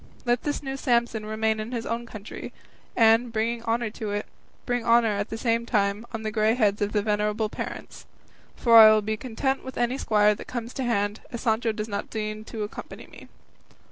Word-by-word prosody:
Let 240 0 +2
this 290 0 -3
new 270 0 -4
Samson 235 -4 0
remain 220 0 0
in 215 +2 -5
his 230 -1 -3
own 235 +1 -3
country, 215 -2 -8 0.4
and, 230 +1 +4
bringing 230 +1 -1
honour 230 -1 -1
to 215 -1 -5
it, 205 +1 -2 0.4
bring 245 -1 -1
honour 230 0 +4
at 205 +1 -2
the 225 - -4
same 230 0 +1
time 205 0 0
on 225 -1 -5
the 215 - -2
grey 215 +1 +2
heads 210 -4 +1
of 205 +1 -1
his 205 - +2
venerable 210 +1 0
parents; - - -7 0.5
for 230 -2 +6
I 220 -1 +11
will 215 -1 +3
be 215 +1 -1
content 265 +4 -2
with 260 - -8
any 245 +3 0
squire 210 -1 +3
that 210 - -10
comes 240 -1 -5
to 265 - -3
hand, 205 -3 0
as 235 - -5
Sancho 225 -1 +1
does 215 0 -4
not 200 -2 -4
deign 215 -1 -4
to 220 -1 -5
accompany 210 - -8
me." - - -14
225 Hz, 205 wpm, -26 LUFS, 215-235 Hz, 0.5 s, I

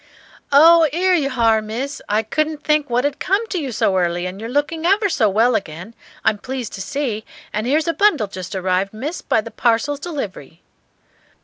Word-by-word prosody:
"Oh, 325 +3 +7
'ere 365 +4 +2
you 295 -6 +1
h'are, 230 -4 +2
Miss. 245 +7 -5
I 210 +2 +1
couldn't 310 +6 -2
think 300 -2 +1
what 245 +2 +1
'ad 285 0 -2
come 395 +5 0
to 370 - -2
you 275 -5 -4
so 195 -3 +1
early; 175 0 -1
and 185 +3 -6
you're 225 - -5
looking 290 +5 -1
ever 400 +4 +3
so 225 - +2
well 225 +5 +3
again, 180 +1 -4 0.3
I'm 210 - +2
pleased 255 -1 -5
to 195 - -6
see; 255 -2 -3 0.3
and 215 +2 -2
'ere's 305 +4 +1
a 335 - +1
bundle 400 - +3
just 185 -1 -7
arrived, 190 +2 -1
Miss, 290 +10 -5
by 225 - +1
the 230 - -10
Parcels 250 +5 0
Delivery." 215 - -7
250 Hz, 195 wpm, -20 LUFS, 210-305 Hz, 0.3 s, Oh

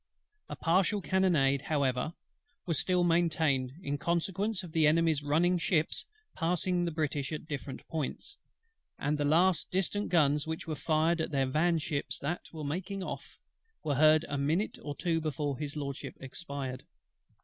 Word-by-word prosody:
A - - -4
partial 185 +4 +2
cannonade, 155 -6 +2
however, 140 +1 0 0.5
was 165 -4 0
still 180 -1 +2
maintained, 160 -6 +2
in 145 0 -2
consequence 185 +4 0
of 175 - -8
the 160 -2 +4
Enemy's 160 -1 +3
running 170 +5 +2
ships 160 -2 0 0.3
passing 175 +1 +1
the 170 - -1
British 150 -3 -2
at 155 - -4
different 140 -3 -6
points; 160 - -4 0.6
and 145 +2 0
the 145 - +1
last 170 +4 +3
distant 195 +3 -1
guns 150 -3 +3
which 160 0 -4
were 160 - -3
fired 160 +3 +1
at - - -2
their 135 -3 +1
van 160 +6 +2
ships 150 -2 -2
that 165 +6 -4
were 155 -2 -6
making 185 +6 -3
off, - - -7 0.5
were 150 - 0
heard 155 +3 +5
a 145 - -2
minute 160 +9 0
or 145 -1 -5
two 165 -1 0
before 150 -2 -2
His 150 0 -4
LORDSHIP 140 -2 -5
expired. 135 -2 -5
155 Hz, 160 wpm, -31 LUFS, 145-175 Hz, 0.6 s, heard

